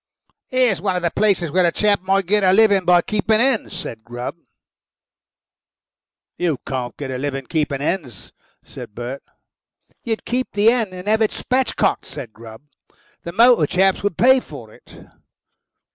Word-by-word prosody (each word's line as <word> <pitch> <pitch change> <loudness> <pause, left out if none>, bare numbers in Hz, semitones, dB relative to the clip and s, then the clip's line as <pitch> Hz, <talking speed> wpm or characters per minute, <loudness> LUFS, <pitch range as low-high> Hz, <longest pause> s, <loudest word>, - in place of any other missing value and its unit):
"Here's 250 -9 +1
one 190 -2 -1
of 180 - -3
the 170 - 0
places 195 -7 +1
where 185 +3 +2
a - - +1
chap 205 0 +1
might 195 +1 +1
get 205 +3 +2
a 185 - +5
living 200 -3 +4
by 175 -1 +4
keeping 215 +1 0
hens," 235 -6 0
said 115 -11 -7
Grubb. 120 +5 -6 2.0
"You 170 -5 0
can't 125 -2 -4
get 140 -2 -5
a 130 - -4
living 135 -1 -3
by - - -28
keeping 145 -4 -1
hens," 145 - -4 0.3
said 105 - -11
Bert. 120 +3 -6 0.8
"You'd 225 -2 -3
keep 255 +2 -2
the 205 +1 0
hen 230 -5 -1
and 180 +1 -9
have 220 +1 +2
it 220 - +3
spatch 255 -1 -1
cocked," - - 0
said 115 -5 -8
Grubb. 110 +2 -13 0.6
"The 170 - -7
motor 230 -5 +5
chaps 190 +3 +2
would 200 -5 -2
pay 260 +2 +5
for 120 - -12
it." - - -17
185 Hz, 170 wpm, -20 LUFS, 140-215 Hz, 2.0 s, a